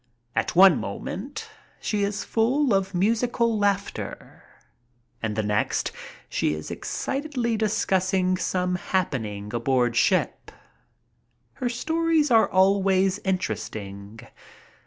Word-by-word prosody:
At 115 +6 -1
one 185 -3 +7
moment 230 - -6 0.3
she 210 -2 -1
is 200 0 -1
full 250 +3 +1
of 195 0 0
musical 230 +4 +1
laughter, 200 -1 -2 0.8
and 110 -2 -2
the 110 - 0
next 105 0 0 0.4
she 75 - 0
is 75 - -7
excitedly 265 -5 -2
discussing 190 -3 +1
some 180 0 -1
happening 110 - -2
aboard 120 0 +1
ship. 185 - +1 1.0
Her 250 -2 -2
stories 320 +3 +1
are 225 -1 +5
always 190 0 +3
interesting. 105 - -4
190 Hz, 100 wpm, -25 LUFS, -, 1.0 s, one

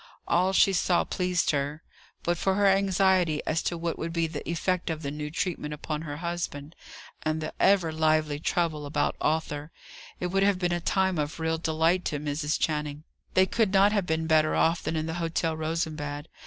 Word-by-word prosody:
All 180 +2 +3
she 195 0 +4
saw 175 0 +2
pleased 180 -2 0
her. 145 +2 -2 0.4
But 175 0 0
for 190 -1 +1
her 205 0 +2
anxiety 190 -4 +3
as 155 +1 0
to 175 - -2
what 165 0 -3
would 165 - -3
be 165 0 0
the 160 -2 -5
effect 180 +2 -1
of 160 -1 -3
the 140 - -3
new 150 0 -5
treatment 150 -2 -3
upon 150 0 -4
her 145 -2 -6
husband, 170 -3 -4 0.5
and 155 0 -1
the 155 - -5
ever 190 -5 +4
lively 155 -2 +1
trouble 155 -2 -1
about 145 0 0
Arthur, 150 -1 -1 0.5
it 180 0 -2
would 195 +1 +2
have 200 -1 +3
been 175 -1 0
a 175 - -1
time 190 -1 +1
of 150 +2 -3
real 160 0 0
delight 165 +3 +1
to 145 - -1
Mrs. 150 +1 -1
Channing. 150 -1 -2 0.3
They 185 - +6
could 215 +1 +1
not 200 +1 +5
have 200 -4 0
been 160 0 0
better 155 -1 +3
off 165 +1 +2
than 165 - -2
in 155 0 -1
the 160 - -3
Hotel 165 -1 -1
Rosenbad. 155 -2 -3
160 Hz, 195 wpm, -27 LUFS, 155-180 Hz, 0.5 s, They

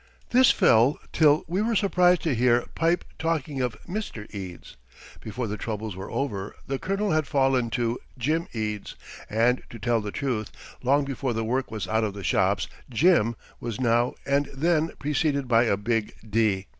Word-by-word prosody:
This 255 +1 +6
fell 120 +6 +4 0.2
till 155 -1 +4
we 180 +5 -1
were 230 +1 +1
surprised 180 -4 +3
to 160 - +1
hear 120 0 +3
"Pipe" 170 +2 +1
talking 155 -4 -1
of 125 -2 -2
"Mr. 175 - -5
Eads." 95 -8 -8 0.4
Before 115 +3 -4
the 105 -1 -4
troubles 110 -3 -4
were 95 +1 -7
over, 105 -8 -3
the 135 0 -3
"Colonel" 195 +1 -1
had 155 -2 +1
fallen 135 -3 +2
to 120 0 -1 0.2
"Jim 155 +7 0
Eads," 105 -2 -4 0.3
and 115 +4 +2
to 115 - -9
tell 115 0 +1
the 105 - -4
truth, 120 -6 -2 0.3
long 140 +3 +3
before 135 -2 -2
the 115 0 -2
work 130 +4 -1
was 105 -5 -4
out 110 +3 +1
of 105 -2 -2
the 100 - -7
shops, 95 +2 +1 0.2
"Jim" 125 - +3 0.2
was 115 -3 -5
now 120 0 +2
and 140 +1 +1
then 160 +2 +2
preceded 140 -1 0
by 120 0 +4
a 100 -4 +2
big 110 +1 -1
"D." 105 -3 +1
125 Hz, 175 wpm, -26 LUFS, 110-150 Hz, 0.4 s, This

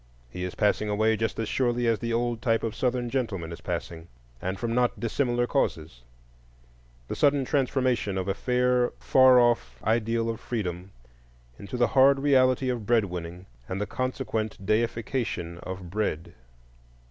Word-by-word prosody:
He 90 - -5
is 90 - -6
passing 105 0 +1
away 110 +2 +2
just 110 0 -2
as 115 - -2
surely 120 -2 0
as 115 -2 +2
the 115 -1 -3
old 120 0 -1
type 115 -2 +1
of 115 -2 -2
Southern 125 -1 0
gentleman 100 -11 -2
is 85 - -8
passing, 80 -1 -5 0.3
and 95 +1 -3
from 115 +1 -2
not 125 0 +1
dissimilar 120 +1 0
causes,—the - - -6
sudden 140 -2 +3
transformation 130 -7 0
of 95 0 -2
a 95 - +1
fair 125 +3 +1
far 130 -1 +6
off 115 - +1
ideal 115 +1 +1
of 115 -1 -3
Freedom 95 -7 -4 0.7
into 100 +5 -6
the 120 -2 +3
hard 135 +1 +6
reality 130 -2 +3
of 120 -5 -3
bread 115 -3 +3
winning 90 0 -7 0.2
and 95 - -3
the 105 - -1
consequent 110 -4 -3
deification 110 -5 -1
of 95 -2 -7
Bread. 85 -5 -2
115 Hz, 155 wpm, -27 LUFS, 90-125 Hz, 0.7 s, far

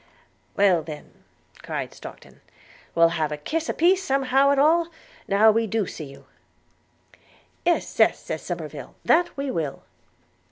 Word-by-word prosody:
'Well 190 -4 +4
then,' 155 -1 -9 0.5
cried - - -5
Stockton, - - -13 0.5
'we'll 165 0 +5
have 155 -2 -1
a 150 - -3
kiss 315 - -3
a - - 0
piece 370 +3 +3
somehow 270 -2 +2
at 280 - +3
all, 325 +4 +4 0.4
now 210 +2 +5
we 225 +1 0
do 220 -1 0
see 160 - -7
you.' 135 0 -14 1.4
'Yes, 345 0 0
yes,' - - +5
said - - -5
Somerive, - - -7
'that 345 -1 +2
we 275 -1 -2
will.' 155 - -4
225 Hz, 145 wpm, -24 LUFS, -, 1.4 s, we'll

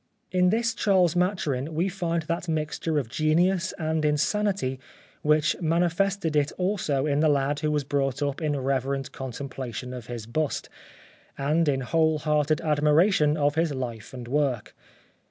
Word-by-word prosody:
In 180 0 +3
this 225 +2 +1
Charles 185 -6 +2
Maturin 160 -6 -1
we 170 +4 +1
find 170 -3 -2
that 170 +2 -3
mixture 155 0 -1
of 135 -5 -1
genius 170 +7 +1
and 160 -1 -1
insanity 150 -2 0 0.4
which 150 +1 +3
manifested 170 +1 +1
it 145 -1 +2
also 180 -8 0
in 145 -1 +1
the 155 0 +4
lad 145 0 +1
who 155 0 0
was 150 -1 0
brought 135 0 -1
up 140 +2 -2
in 150 -2 0
reverent 135 0 -1
con 130 -1 -6
templation 125 -1 -6
of 125 -2 -8
his 120 -3 -6
bust, 150 +6 -2 0.7
and 150 +3 +1
in 135 -1 0
whole 160 +3 +2
hearted 150 +1 +1
admiration 150 +1 +3
of 145 -1 +2
his 160 -2 0
life 115 -4 -5
and 125 -3 -8
work. 135 -4 -1
150 Hz, 155 wpm, -26 LUFS, 135-170 Hz, 0.7 s, the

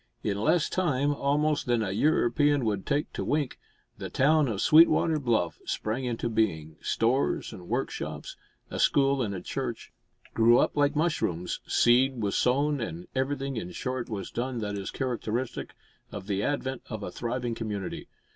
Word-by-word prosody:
In 100 0 -1
less 165 +9 +3
time, 145 -6 +1
almost, 145 +1 0
than 120 -2 +2
a 95 - -2
European 145 +3 +2
would 100 -3 -1
take 145 +1 0
to - - -3
wink, 145 -3 -1 0.4
the - - -5
town 150 +2 +3
of 105 -5 -2
Sweetwater 160 +3 +5
Bluff 115 - 0
sprang 115 +5 -2
into 120 -1 -2
being; 85 -9 -1
stores 120 +1 0
and 90 -4 -10
workshops, - - -3 0.4
a - - -4
school 140 -1 +3
and 100 -5 -2
a 90 - -5
church, - - -5 0.4
grew, 115 +1 +5
up - - +2
like 145 0 +2
mushrooms; 150 - -1
seed 125 +2 +3
was 100 -3 -1
sown, 140 +3 +2
and 90 -5 -6
everything, 135 0 -2
in 90 -5 -4
short, 125 +2 -3
was 100 -4 -5
done 125 +1 -3
that 105 -2 -3
is 100 -1 -4
characteristic 120 -1 -3 0.4
of - - -7
the 100 -1 -1
advent 130 0 -2
of 110 -3 -5
a - - -5
thriving 120 0 -3
community. 105 -4 -5
120 Hz, 165 wpm, -28 LUFS, 110-140 Hz, 0.4 s, Sweetwater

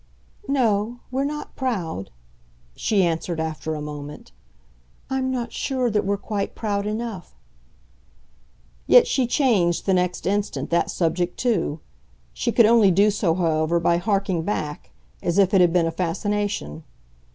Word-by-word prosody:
"No, 235 -3 +1
we're 265 +2 0
not 300 +1 -5
proud," 185 - -3 0.7
she 205 -3 +1
answered 165 0 -2
after 160 0 -3
a 150 - -5
moment. 150 0 -8 0.8
"I'm 265 0 0
not 245 -2 -3
sure 255 -3 -1
that 210 0 +1
we're 200 +1 0
quite 200 0 -4
proud 205 -2 -2
enough." 215 -4 -5 1.5
Yet - - +7
she 255 -3 +1
changed 215 - +2
the 195 - +2
next 180 -1 0
instant 195 -8 -1
that 170 - +2
subject 175 +1 -1
too. 180 -10 0 0.5
She - - -1
could 235 - +5
only 225 -2 +5
do 200 +4 +4
so, 190 -5 0
however, 165 -1 +1
by 170 0 +2
harking 195 -2 0
back 155 -5 -4 0.3
as 170 - -1
if 195 -1 +4
it 190 - +6
had 175 -1 +5
been 170 -1 +3
a 165 - -1
fascination. 180 - -2
195 Hz, 145 wpm, -23 LUFS, 165-220 Hz, 1.5 s, Yet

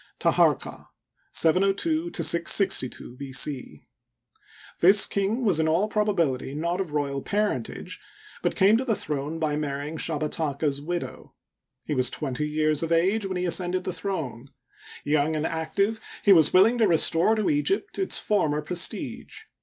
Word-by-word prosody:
Taharqa - - +1 0.4
(702 195 - +1
662 170 - +2
B. 140 0 -8
c.). 125 - -3 0.9
This 195 +4 +6
king 205 +5 -2
was 185 -7 +2
in 160 - +1
all 170 +6 +1
probability 170 -12 -1
not 170 +4 -2
of 170 -6 -6
royal 140 -2 -2
parentage, 205 - -3 0.4
but - - -1
came 200 +4 +4
to 255 - -2
the 230 -4 0
throne 150 0 -4
by 155 -2 -1
marrying 145 +1 -4
Shabataka's 150 -2 -2
widow. 175 +3 -6 0.5
He - - -3
was 130 -3 0
twenty 140 +2 -4
years 155 0 0
of 165 0 -3
age 195 +5 +1
when 190 -1 -4
he 180 - -2
ascended 180 +1 -1
the 185 - -4
throne. 150 - -5 0.5
Young 150 +1 0
and 155 0 -2
active, 180 +8 -1 0.2
he 200 - +7
was 160 -5 +5
willing 225 +6 +4
to 220 - +4
restore 170 +4 +4
to 215 +7 0
Egypt 380 +9 -1
its 385 - +3
former 155 -8 0
prestige. 180 - -3
165 Hz, 145 wpm, -25 LUFS, 150-200 Hz, 0.9 s, he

